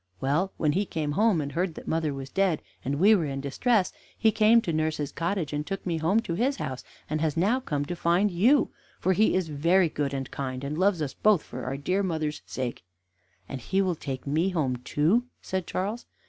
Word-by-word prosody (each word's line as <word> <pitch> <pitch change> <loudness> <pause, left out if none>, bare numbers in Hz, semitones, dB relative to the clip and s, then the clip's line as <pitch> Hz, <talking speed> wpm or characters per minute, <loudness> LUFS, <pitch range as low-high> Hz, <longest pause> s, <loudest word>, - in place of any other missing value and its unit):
Well, 155 - +1
when 150 -2 +2
he 190 +7 +1
came 155 -2 -2
home, 205 0 +3
and 140 -1 -4
heard 170 0 -1
that - - -10
mother 160 -2 0
was 135 -1 -7
dead, 190 -5 +1 0.2
and 140 +2 -1
we 205 +5 +7
were 175 -7 +2
in 135 -1 -3
distress, 185 - +1 0.2
he 220 - +4
came 220 +2 +5
to 170 - -2
nurse's 155 -2 -1
cottage, 170 -2 -2
and 150 0 -1
took 195 +4 -5
me 170 -3 0
home 190 +8 +2
to 175 - -4
his 255 +10 +1
house, 130 - -5 0.2
and 155 +1 -2
has 160 -2 0
now 210 +10 +3
come 145 - -2
to 175 - -4
find 175 +5 +2
you, 235 +12 +3 0.3
for 190 - +2
he 215 +2 +3
is 185 -3 0
very 165 +4 +3
good 145 -2 -2
and 135 -1 -4
kind, 130 -1 -4
and 140 +2 -3
loves 185 -1 +2
us 140 - -4
both 210 -6 +3
for 125 +1 -7
our 135 +2 -3
dear 185 +8 0
mother's 155 -5 -2
sake." 125 -6 -4 0.6
"And 135 - -6
will 190 -1 +2
he 160 - -12
take 130 -2 -5
me 155 +6 +1
home 145 -9 0
too?" 155 - +1
said 185 -1 -3
Charles. 205 +6 -3
165 Hz, 220 wpm, -27 LUFS, 145-195 Hz, 0.6 s, we